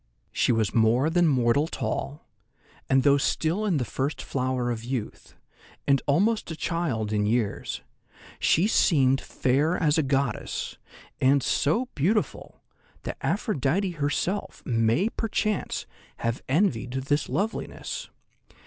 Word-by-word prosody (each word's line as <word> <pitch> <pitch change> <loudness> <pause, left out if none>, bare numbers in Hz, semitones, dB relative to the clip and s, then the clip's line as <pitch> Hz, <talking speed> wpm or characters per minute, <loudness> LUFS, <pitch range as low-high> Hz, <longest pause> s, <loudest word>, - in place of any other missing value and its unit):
She - - +2
was 110 -3 +1
more 120 +6 +3
than 175 0 +4
mortal 130 +1 +3
tall, 145 -2 -4 0.6
and 135 -1 +4
though 140 -1 +5
still 170 +9 0
in 180 -6 +2
the 125 - -1
first 135 +5 -2
flower 130 -2 -1
of 115 -1 -4
youth, 125 -2 -5 0.5
and 140 -1 +4
almost 200 +10 +2
a 165 - -4
child 145 - -2
in 105 -1 +1
years, 110 -2 -1 0.6
she 170 - +3
seemed 135 - +3
fair 145 +7 +1
as 160 -2 +2
a - - +4
goddess, 135 -4 -2 0.4
and 135 +1 +4
so 225 - +1
beautiful 195 +9 -1 0.4
that - - -5
Aphrodite 190 - 0
herself 165 +5 -2
may 115 - +2
perchance 215 -2 -2 0.3
have 115 +1 -2
envied 130 - +1
this 140 +3 -1
loveliness. 225 - -3
140 Hz, 125 wpm, -26 LUFS, 125-175 Hz, 0.6 s, though